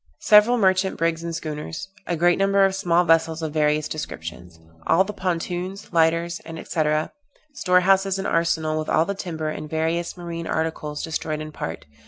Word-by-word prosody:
Several 215 +3 +6
merchant 190 -2 +2
brigs 165 0 0
and 170 -1 -4
schooners. 155 +3 -5 0.2
A 175 - 0
great 175 +2 +3
number 195 0 +4
of 195 - +1
small 180 -3 +2
vessels 165 -1 +2
of 155 -2 -3
various 150 0 +1
descriptions. 85 - -7 0.3
All 180 +3 +5
the 210 +2 -6
pontoons, 180 +1 -3
lighters, 165 +1 +2
&c., 165 0 -3 0.7
Store 180 -8 +3
houses 195 +1 +3
and 195 - -4
arsenal, 160 -3 +1
with 155 - -4
all 160 - +3
the 200 - -2
timber, 160 -5 -4
and 155 0 -6
various 165 +3 -1
marine 170 -1 -6
articles 155 -2 -2
destroyed 155 -1 -3
in 155 0 -6
part. - - -6
165 Hz, 170 wpm, -23 LUFS, 155-185 Hz, 0.7 s, Several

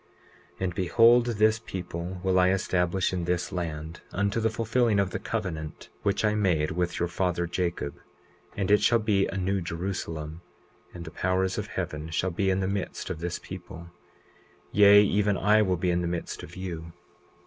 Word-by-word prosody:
20:22 - - -22
And 90 -2 -1
behold, 115 +7 +5
this 110 -1 +3
people 90 -3 -6
will 95 -1 +3
I 90 0 +5
establish 95 -1 +1
in 90 -2 -2
this 90 0 -1
land, 80 -2 -5
unto 100 +3 0
the 110 0 +2
fulfilling 115 -1 +1
of 95 -2 +1
the - - -3
covenant 85 -9 -5
which 100 +1 +1
I 105 - +2
made 90 -8 +1
with 90 +1 -1
your 85 - +1
father 90 0 -1
Jacob; 85 -4 -3 0.6
and 100 -1 0
it 105 - +5
shall 120 - +4
be 105 -3 +1
a 95 - -5
New 95 +1 0
Jerusalem. 85 -2 -4 0.5
And 85 -1 -8
the - - -8
powers 95 0 0
of - - -4
heaven 75 +1 -4
shall 90 +3 -1
be 95 +3 0
in 95 0 +1
the 95 - 0
midst 100 -1 -3
of 85 - -5
this 85 +1 -3
people; 85 -2 -10 0.8
yea, 105 0 +7
even 105 0 +2
I 105 +2 +4
will 95 -3 +1
be 90 +1 0
in 85 0 +1
the 85 - -1
midst 85 -1 -4
of 85 - -11
you. 85 -3 -6
95 Hz, 185 wpm, -27 LUFS, 85-100 Hz, 0.8 s, yea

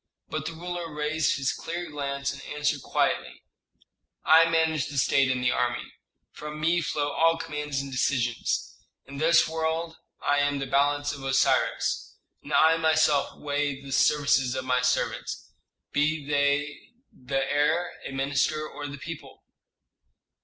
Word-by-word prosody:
But - - -3
the 165 - -4
ruler 175 0 -5
raised 150 +1 0
his 135 -2 0
clear 170 0 -5
glance, 140 -1 -3
and - - -10 0.2
answered 150 -1 0
quietly, - - -1 0.8
"I 165 +1 +7
manage 160 -3 +1
the 145 - -7
state 135 0 +3
and 125 -1 0
the 125 - +3
army. 125 -1 -2 0.4
From 150 0 -8
me 170 +3 +2
flow 145 -2 -1
all 165 +3 +3
commands 150 -3 -3
and 140 0 -7
decisions. 125 -2 -1 0.3
In 140 0 -10
this 160 +3 +4
world 160 +1 -2 0.2
I 145 0 +1
am 145 0 +1
the 135 - -3
balance 145 +2 +1
of 140 -1 -9
Osiris, 135 0 +1 0.3
and - - -11
I 160 +1 +5
myself 155 -3 +2
weigh 145 -1 -2
the 140 0 -10
services 135 -2 +3
of 130 0 -3
my 125 -1 +2
servants, 125 0 -1 0.4
be 150 +1 0
they 145 0 +1 0.3
the 130 +2 -7
heir, 145 +6 +1
a - - -6
minister, 145 +3 0
or 145 -1 -7
the 140 0 -7
people. 160 +1 -9
145 Hz, 150 wpm, -26 LUFS, 140-160 Hz, 0.8 s, I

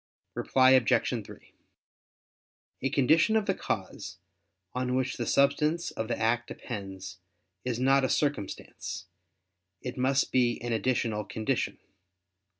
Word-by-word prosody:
Reply 130 0 +4
Obj. 130 -5 +3
3: - - -14 1.3
A 135 - +1
condition 160 - +4
of 220 -2 +2
the 195 - +2
cause, 95 - -4 0.6
on 125 0 -1
which 130 0 0
the 120 - -3
substance 150 +4 +2
of 110 - -4
the 120 - -1
act 115 +2 +1
depends, 95 -4 -7 0.4
is 125 -2 -2
not 135 +1 +4
a 130 - +1
circumstance; 140 -10 -2 0.8
it 125 0 -5
must 135 +2 +2
be 120 -2 +2
an 120 -1 -1
additional 110 -1 0
condition. 110 +2 -2
125 Hz, 125 wpm, -29 LUFS, 110-135 Hz, 1.3 s, Reply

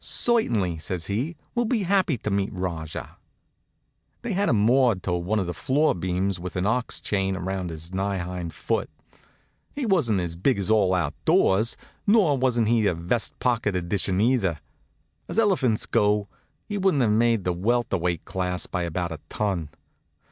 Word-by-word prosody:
"Certainly," 110 - +1
says 85 0 -4
he, 125 - -2 0.2
"we'll 240 -1 +1
be 225 -2 0
happy 185 -6 +2
to 105 - -4
meet 100 0 0
Rajah." 85 -5 -5 1.1
They 235 -3 -2
had 200 +2 +1
him 120 - +3
moored 115 -1 +3
to 90 - -1
one 90 +5 -1
of 95 - 0
the 90 - -3
floor 145 - +2
beams 90 +1 -1
with 90 +1 -6
an 90 0 0
ox 120 +4 0
chain 95 -2 -1
around 95 0 -3
his 80 +2 -8
nigh 100 +1 -1
hind 90 -1 -4
foot. - - -2 0.9
He 285 -3 -2
wasn't 150 - +2
as 85 -2 -3
big 110 +9 +1
as 100 +1 -1
all 100 -4 +4
out 90 - 0
doors, 110 +5 +3 0.3
nor 200 -9 +5
he - - -3
wasn't 120 -4 +2
any 115 -2 +3
vest 90 +7 -1
pocket 115 -5 0
edition 90 +1 -1
either. 105 - +2 0.7
As - - -6
elephants 175 - +2
go, 105 0 +2 0.4
he 205 -1 -3
wouldn't 185 -9 +3
have 110 - +2
made 115 -1 +2
the 90 - 0
welter 110 +3 0
weight 85 -1 -2
class 90 -1 -2
by 90 - -3
about 85 +1 -2
a 80 - -6
ton. 95 -8 -2
100 Hz, 175 wpm, -25 LUFS, 90-125 Hz, 1.1 s, nor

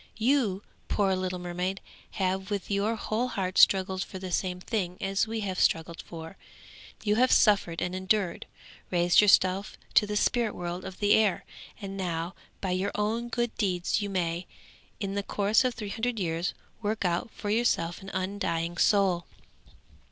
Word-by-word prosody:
You, 225 -5 +2 0.2
poor 195 -2 +2
little 185 0 -2
mermaid, 180 +2 -3 0.3
have 190 0 -1
with 205 -1 -3
your 205 +3 +1
whole 220 +3 -1
heart 190 -6 -1
struggled 190 -1 +4
for 190 - -8
the 185 -1 -6
same 180 0 -1
thing 180 -2 -2
as 195 +2 0
we 225 0 -3
have 190 -2 -3
struggled 165 +1 +1
for. 165 +2 -9 0.7
You 210 0 +2
have 255 +2 +4
suffered 195 -6 +4
and 180 - -2
endured, 185 -1 0 0.4
raised 175 +1 +5
yourself 195 -1 +3 0.2
to 210 - +5
the 210 0 -1
spirit 235 -1 +1
world 175 +1 -4
of 190 -1 -7
the 205 0 +3
air, 210 -4 +3 0.3
and 195 -2 -6
now, 170 -1 -2 0.3
by 190 - -1
your 185 +2 0
own 225 +3 -1
good 240 -1 -1
deeds 185 -1 0
you 205 - -2
may, 175 -2 -1 0.5
in 195 -1 -3
the 200 - 0
course 205 +3 +2
of 250 -2 0
three 210 -3 -5
hundred 230 +3 -2
years, 170 -1 -1 0.3
work 210 -1 -1
out 175 +5 0
for 205 -1 -5
yourself 195 -7 +1
an 195 - -8
undying 185 -3 -2
soul.' 190 -5 +3
195 Hz, 165 wpm, -28 LUFS, 180-210 Hz, 0.7 s, raised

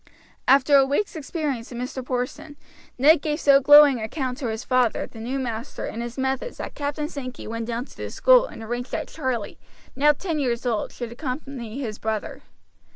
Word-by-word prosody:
After 275 +2 +6
a 270 - +6
week's 290 +9 -1
experience 285 -6 -3
of 240 - -6
Mr. 250 +1 -4
Porson, 265 +4 -4 0.4
Ned 290 +4 +6
gave 300 0 -2
so 280 -3 +6
glowing 290 -1 +8
an - - -4
account 255 +2 -3
to 260 - -2
his 220 +1 -3
father 255 -3 +2
of - - -9
the 225 - -11
new 245 +4 -3
master 240 -1 -4
and 230 - -5
his 240 +1 -6
methods 265 - -2
that - - -6
Captain 290 +1 -3
Sankey 255 -5 -7
went 230 0 -4
down 235 +1 -3
to - - -17
the - - -6
school - - +5
and 225 - -10
arranged 240 +3 -4
that - - -3
Charlie, 260 -8 -3 0.4
now 295 +2 +5
ten 320 +1 -3
years 245 -3 -1
old, 230 -4 -1
should 240 -2 -6
accompany 255 -2 -5
his 220 -6 -5
brother. 220 -1 -3
260 Hz, 200 wpm, -24 LUFS, 235-290 Hz, 0.4 s, glowing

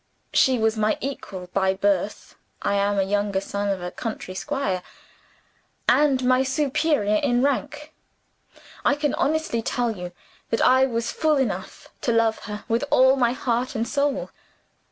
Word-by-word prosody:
"She 260 -1 +4
was 220 0 +1
my 215 0 +1
equal 205 -9 -6
by 190 -1 +2
birth 200 +1 -1 0.3
(I 200 - +1
am 200 0 +1
a 195 - +3
younger 200 0 0
son 200 +1 -3
of 190 -2 -2
a 180 - -4
country 215 -4 -5
squire), 205 -5 -2 1.1
and 280 -3 +4
my 255 +1 +4
superior 270 -4 +1
in 245 0 +1
rank. 295 +2 -2 0.9
I 285 - +3
can 295 0 -1
honestly 310 -6 0
tell 240 +1 -1
you 180 -1 -7 0.4
that 225 - 0
I 260 +1 +5
was 235 -2 -2
fool 310 -2 +1
enough 200 -8 -3
to 240 - 0
love 230 -1 +2
her 210 0 -6
with 230 +4 0
all 260 +1 +5
my 245 -3 +2
heart 250 0 -1
and 230 +1 -1
soul. 285 -1 -1
235 Hz, 155 wpm, -24 LUFS, 205-275 Hz, 1.1 s, I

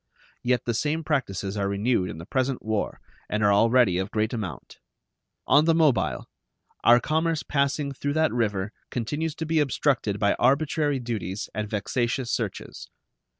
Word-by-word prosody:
Yet 125 0 0
the 120 - 0
same 150 +7 -1
practices 100 - -2
are 100 -1 0
renewed 100 -1 0
in - - -7
the 80 - -8
present 130 +1 -1
war 110 -1 -2 0.3
and 105 0 0
are 100 0 +5
already 115 -3 +4
of 95 +1 -2
great 110 +2 -1
amount. 100 - -6 0.7
On 150 +2 +5
the 165 0 +4
Mobile, 145 - +2 0.6
our 120 +1 +7
commerce 160 +3 0
passing 140 0 0
through 145 +1 -3
that 160 +1 +2
river 105 -4 -1 0.2
continues 145 +7 -3
to 160 - -4
be 160 0 +1
obstructed 135 -6 +1
by 100 0 +2
arbitrary 145 +2 +2
duties 110 -5 -4
and 105 0 -3
vexatious 120 +4 -1
searches. - - -4
120 Hz, 155 wpm, -25 LUFS, 105-145 Hz, 0.7 s, our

